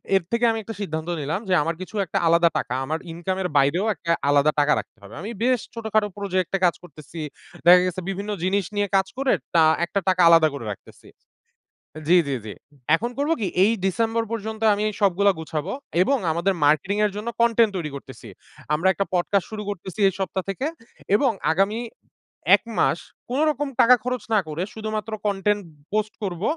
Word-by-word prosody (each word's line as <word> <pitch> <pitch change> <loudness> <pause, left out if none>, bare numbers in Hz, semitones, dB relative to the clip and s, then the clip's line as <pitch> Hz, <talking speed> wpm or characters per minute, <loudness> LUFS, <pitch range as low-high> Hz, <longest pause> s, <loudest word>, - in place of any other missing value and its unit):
এর 190 - +3
থেকে 235 +1 +2
আমি 225 - -2
একটা 225 +1 -7
সিদ্ধান্ত 160 -4 -4
নিলাম 155 +6 -2
যে - - +3
আমার 165 +3 -1
কিছু 185 - -8
একটা 190 - -3
আলাদা 170 +1 +5
টাকা, 135 - -3
আমার 160 +4 -2
ইনকাম 175 +3 -3
এর 180 - -1
বাইরেও 140 +8 +3
একটা 170 +1 -3 0.2
আলাদা 145 +1 +4
টাকা 145 0 +4
রাখতে - - -10
হবে। 100 +2 -13
আমি 210 +4 -5
বেশ 250 0 +3
ছোটখাটো 220 -2 0
প্রজেক্টে 190 -2 -1
কাজ 175 - +3
করতেছি। 155 -1 -11 0.5
দেখা 180 +1 +9
গেছে 185 0 -3
বিভিন্ন 200 +2 -4
জিনিস 195 +1 +1
নিয়ে 205 0 +1
কাজ 190 0 +3
করে 270 0 +2 0.2
টা 165 - +6 0.2
একটা 185 +3 -1
টাকা 185 -1 +3
আলাদা 165 -1 +6
করে 140 -5 -6
রাখতেছি। 100 - -12 1.0
জি, 180 - +6
জি, 140 - 0
জি। 105 - -6 0.4
এখন 235 +8 -3
করব 290 +3 0
কি 205 - 0 0.2
এই 215 - +4
ডিসেম্বর 225 +4 0
পর্যন্ত 220 -1 -4
আমি 205 +1 -2 0.2
সবগুলা 200 0 +3
গুছাবো 155 -2 -4 0.3
এবং 275 +8 +2
আমাদের 175 +4 0
মার্কেটিং 155 +7 +2
এর 210 - 0
জন্য 210 +3 -4
কনটেন্ট 230 -1 +4
তৈরি 160 -4 -3
করতেছি। 140 - -11 0.5
আমরা 165 +5 +2
একটা 195 - -1
পডকাস্ট 180 +2 +1
শুরু 215 -1 -5
করতেছি 190 +1 -7
এই - - -1
সপ্তাহ 190 0 -2
থেকে 255 +8 -3 0.5
এবং 265 +4 +2 0.2
আগামী 195 +6 +1 0.8
১ - - -19 0.2
মাস 170 - +2 0.3
কোনরকম 290 +1 +1
টাকা 250 +2 +7
খরচ 250 -2 -2
না 215 - +5
করে 155 +3 -3
শুধুমাত্র 215 0 -4
কনটেন্ট 205 +1 0 0.3
পোস্ট 215 0 0
করব। 180 -3 -4
195 Hz, 185 wpm, -23 LUFS, 170-215 Hz, 1.0 s, দেখা